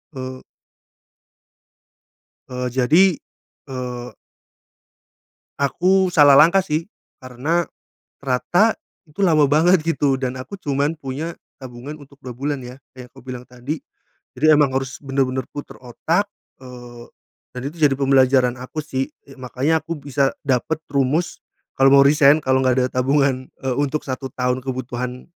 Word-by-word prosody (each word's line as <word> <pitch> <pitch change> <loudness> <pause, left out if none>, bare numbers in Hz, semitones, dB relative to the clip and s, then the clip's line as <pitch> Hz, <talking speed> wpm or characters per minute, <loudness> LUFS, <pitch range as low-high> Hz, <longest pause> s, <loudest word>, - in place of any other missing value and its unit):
Eee 130 0 -7 2.1
Eee, 125 0 -3
jadi, 155 +8 +4 0.5
eee. 125 -2 -6 1.5
Aku 185 +7 +2
salah 145 -4 +7
langkah, 180 +4 +5
sih, 160 0 -2 0.3
karena 135 +7 -2 0.5
ternyata 165 - +1 0.3
itu 150 +6 -19
lama 155 -5 +4
banget, 165 +5 +4
gitu, 145 -4 +1
dan 130 -1 -3
aku 130 +10 -8
cuman 145 +2 -1
punya 145 +5 -5 0.2
tabungan 130 +3 -9
untuk 140 0 -17
2 125 -2 -7
bulan, 140 +1 -3
ya, 125 +1 -9 0.2
kayak 125 -1 -10
aku - - -16
bilang 125 -1 -7
tadi. 125 +5 -6 0.6
Jadi 140 +5 0
emang 145 -2 +3
harus 135 0 -3
benar-benar 135 -1 -1
putar 145 - -9
otak, 165 - -1 0.4
eee, 120 -2 -11 0.5
dan 125 - -5
itu 165 - -17
jadi 145 -4 +4
pembelajaran 130 -2 +3
aku, 130 +5 -9
sih, 135 -3 -3 0.2
eee, 135 0 -15
makanya 135 +5 -1
aku 165 +1 -5
bisa 140 -1 0
dapat 135 +3 0
rumus 140 +5 0 0.4
kalau 135 0 +4
mau 140 - +7
resign, 145 0 +5
kalau 130 -3 +1
enggak 130 0 +2
ada 125 - +2 0.2
tabungan, 135 -1 +1
eee, 130 -2 -1
untuk 145 +1 -1
1 130 0 -5
tahun 125 0 -1
kebutuhan 125 -1 -5
135 Hz, 135 wpm, -21 LUFS, 130-150 Hz, 2.1 s, salah